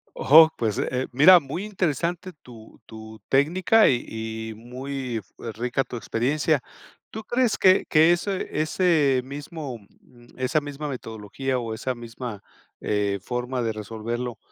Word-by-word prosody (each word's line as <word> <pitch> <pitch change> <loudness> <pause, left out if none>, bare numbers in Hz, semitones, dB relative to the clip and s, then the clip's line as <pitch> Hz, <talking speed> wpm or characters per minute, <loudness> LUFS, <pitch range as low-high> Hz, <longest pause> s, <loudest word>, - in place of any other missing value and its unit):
Oh, 160 +3 +7
pues, 110 -4 -1
eh, 130 +1 -2
mira, 160 +8 +8
muy 150 +5 -6
interesante 180 -2 -2
tu 115 -3 -15
tu 110 0 -12
técnica 180 +10 +4
y 120 -3 +1 0.4
y - - -6
muy, 125 +1 -5
eh, - - -4 0.3
rica 125 +4 -1
tu - - -8
experiencia. 135 +5 0 0.5
¿Tú 220 0 -7
crees 240 0 +1
que 185 0 +4
que 160 +2 +5
ese 185 +2 -1
ese 155 -5 +2
mismo 140 -1 -7 0.2
mm, 120 -1 -21
esa 130 +4 +1
misma 145 0 -6
metodología 125 +1 -4
o 115 -2 -4
esa 125 +3 -3
misma, 120 -2 -8 0.4
eh, 100 -1 -1
forma 125 +3 -3
de 115 - -1
resolverlo, 115 +3 -5
130 Hz, 140 wpm, -24 LUFS, 120-155 Hz, 0.5 s, mira